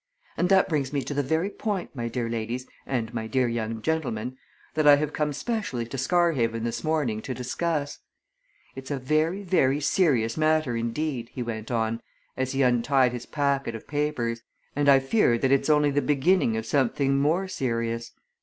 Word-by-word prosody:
And 180 - +1
that 195 -1 +5
brings 145 -6 -1
me 140 -2 -1
to - - -4
the 145 - +1
very 160 +8 0
point, 200 -8 -3
my 120 -2 -3
dear 115 0 -2
ladies 115 +2 -3 0.2
and 120 -3 -2
my 110 -1 -3
dear 130 +1 +1
young 115 -1 -3
gentleman, 130 -7 -2 0.4
that 155 -1 +2
I 145 - +10
have 150 0 -2
come 150 -1 0
specially 150 - -3
to 120 - -8
Scarhaven 130 -7 +1
this 115 0 -3
morning 145 -9 0
to 130 - -5
discuss. 145 +3 -2 0.8
It's 130 0 -8
a 145 - -1
very, 155 +8 0
very 145 -7 +2
serious 135 -8 +2
matter 155 -5 +2
indeed," 120 +1 -2
he 125 - -3
went 110 -2 -5
on 115 -1 -1 0.3
as 130 0 -2
he 135 0 +2
untied 125 +1 +3
his 120 - -6
packet 140 -5 0
of 110 - -9
papers, 145 -6 -1 0.3
"and 145 0 +3
I 140 - +8
fear 135 - +2
that 130 +2 +1
it's 140 +2 +2
only 150 -1 +4
the 145 +1 +1
beginning 145 -2 +2
of 110 - -3
something 135 0 +1
more 165 +7 +1
serious. 115 -6 -2
135 Hz, 180 wpm, -26 LUFS, 115-150 Hz, 0.8 s, I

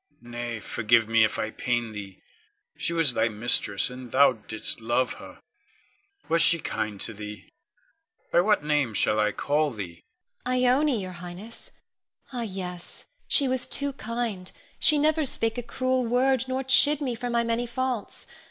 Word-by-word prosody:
Nay, 120 -1 -5
forgive 115 +1 +2
me 115 0 +4
if 110 - +1
I 110 - -2
pain 120 -1 -2
thee. 100 -3 -9 0.5
She - - -2
was 165 -6 +4
thy 110 0 +1
mistress, 105 -1 +1
and 125 -1 -9
thou 140 0 +5
didst 110 0 -1
love 120 +3 0
her. - - -13 0.8
Was 165 0 +2
she 170 - +7
kind 110 -9 -4
to 110 - -1
thee? 105 -1 -9 0.8
By 175 - +5
what 210 -4 +2
name 150 -7 0
shall 105 +2 +2
I 105 0 +2
call 150 +6 0
thee? 100 -9 -8 0.5
Ione. 255 0 +1
Ione, 260 0 +3
your 185 -1 -6
Highness. 180 +6 -10 0.6
Ah, 245 - -3
yes; 185 -5 -7 0.2
she 280 - +3
was 255 -1 -1
too 280 0 -2
kind. 230 -6 -4 0.3
She 305 - +5
never 310 +1 +2
spake 225 -3 -2
a - - -2
cruel 255 +1 -1
word, 255 +2 +2
nor 260 +1 -2
chid 285 +3 +5
me 265 -5 -2
for 240 +1 -4
my 235 0 +1
many 230 +1 -1
faults. 255 -2 -4
175 Hz, 165 wpm, -26 LUFS, -, 0.8 s, she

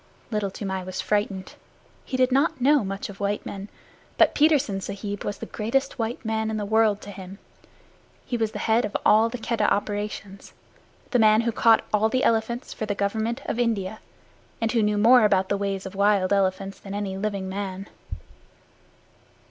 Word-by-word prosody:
Little 210 -2 -1
Toomai 190 -1 -4
was 185 0 -6
frightened. 205 -2 -1 0.5
He 260 - -3
did 255 0 +3
not 275 +1 +2
know 280 +1 +4
much 195 +1 -4
of 200 -1 -11
white 205 0 -2
men, 200 +1 -7 0.5
but - - +5
Petersen 285 -10 +2
Sahib 200 +1 -5
was 205 - -3
the - - -6
greatest 270 +5 -2
white 230 +2 -3
man 220 0 -1
in 220 - -2
the 210 - -2
world 215 -1 +2
to 205 - -9
him. 190 0 -10 0.9
He 245 - -3
was 225 -2 0
the - - -6
head 230 +2 +3
of 210 - -2
all 220 +2 +5
the 250 - -5
Keddah 230 -2 0
operations 205 -1 -3 0.6
the 245 - +3
man 215 0 +5
who 235 0 0
caught 225 0 +4
all 215 +1 +3
the 255 +2 0
elephants 230 +3 0
for 215 - -5
the 205 - -1
Government 220 +6 -2
of 230 - -3
India, 220 -3 -1 0.6
and 225 -1 0
who 235 - +2
knew 210 0 +1
more 235 +3 +6
about 190 -3 +3
the 200 - +1
ways 195 -1 -3
of 190 +1 -7
elephants 195 -1 +1
than 195 0 -7
any 200 -2 -3
living 200 -1 -3
man. 195 0 -5
210 Hz, 180 wpm, -25 LUFS, 195-225 Hz, 0.9 s, more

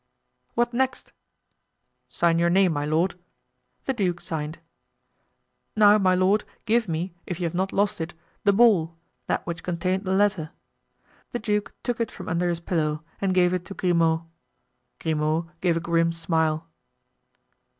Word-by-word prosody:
"What 240 +1 +1
next?" 260 +1 -1 1.0
"Sign 170 -1 +2
your 170 0 +3
name, 185 -1 +4
my 145 -1 -1
lord." 165 +4 0 0.7
The 265 - 0
duke 185 -7 0
signed. 155 -1 -4 1.2
"Now, 210 0 +6
my 185 -2 +3
lord, 190 +3 +3 0.2
give 230 0 +2
me, 170 +2 -3
if 180 -1 -4
you - - -3
have 165 - -2
not 190 +2 0
lost 205 -1 +1
it, 160 +1 -5 0.3
the 200 - +5
ball—that 175 -7 +1
which 170 -1 -4
contained 185 +3 -1
the 190 0 +1
letter." 195 -6 +2 0.8
The - - 0
duke 210 -3 -2
took 245 -2 -2
it 230 - 0
from - - -10
under 175 +1 +1
his 170 -1 -2
pillow 155 -3 -1 0.2
and 195 -1 +1
gave 180 -1 +3
it 180 -1 -1
to 195 - -8
Grimaud. 165 -3 +2 0.8
Grimaud 160 +1 0
gave 175 -2 +2
a - - +1
grim 165 0 +1
smile. 160 -1 0
175 Hz, 150 wpm, -25 LUFS, 165-200 Hz, 1.2 s, Now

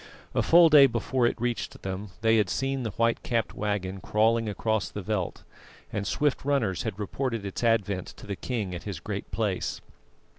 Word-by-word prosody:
A - - +2
full 170 0 +7
day 145 -3 +8
before 120 +1 +1
it - - -2
reached 120 0 -3
them, 95 +2 -4
they 115 0 +4
had 105 -4 +2
seen 135 +6 -1
the 115 - -2
white 115 +3 +1
capped 115 -3 -1
waggon 100 -2 -2
crawling 115 +1 +2
across 110 0 -1
the 105 - -6
veldt, 95 -3 -2 0.5
and 100 - -2
swift 145 -2 0
runners 120 -11 +1
had 110 -4 -4
reported 115 +1 -3
its 100 +4 -5
advent 100 -5 +1
to - - -11
the 100 -1 -4
king 105 -1 -3
at 85 - -5
his - - -5
Great - - -5
Place. - - -2
110 Hz, 185 wpm, -27 LUFS, 100-120 Hz, 0.5 s, day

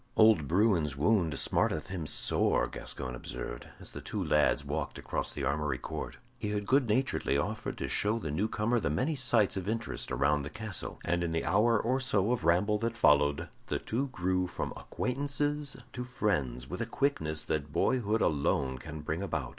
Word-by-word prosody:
"Old 110 -10 +6
Bruin's 85 -6 +2
wound 85 -3 +2
smarteth 75 +4 +1
him 90 -5 -4
sore," - - +2
Gascoyne 65 -2 -5
observed, - - -6
as - - -6
the - - -7
two - - -3
lads 75 -1 +2
walked - - -3
across - - -3
the 70 - -5
armory 70 0 0
court. - - -6 0.2
He 105 - -2
had 105 -1 -2
good 130 0 +3
naturedly 105 - +1
offered 105 +10 -3
to - - -3
show 105 +2 +2
the 80 -10 -4
new 95 +9 0
comer 115 +3 +1
the 100 - -1
many 130 - 0
sights 120 -7 +3
of 95 +1 -3
interest 115 +1 -3
around 75 +3 +2
the 70 - -5
castle, 110 -1 -3
and 85 +1 +1
in 85 - -1
the 80 - -1
hour 115 +1 +4
or 130 +5 +1
so 110 -5 +1
of 120 -9 -1
ramble 100 +5 +3
that 115 0 -2
followed, 75 -3 +4 0.2
the - - 0
two 130 +5 -2
grew 90 -6 0
from - - -4
acquaintances 145 +2 -2 0.2
to 125 - -4
friends 75 - -1
with 75 - -5
a 120 - -1
quickness 80 - 0
that 75 -2 -2
boyhood 110 - +1
alone 70 -3 +1
can 80 +2 -7
bring 80 +3 -3
about. 100 -4 -2
95 Hz, 185 wpm, -31 LUFS, 75-115 Hz, 0.2 s, Old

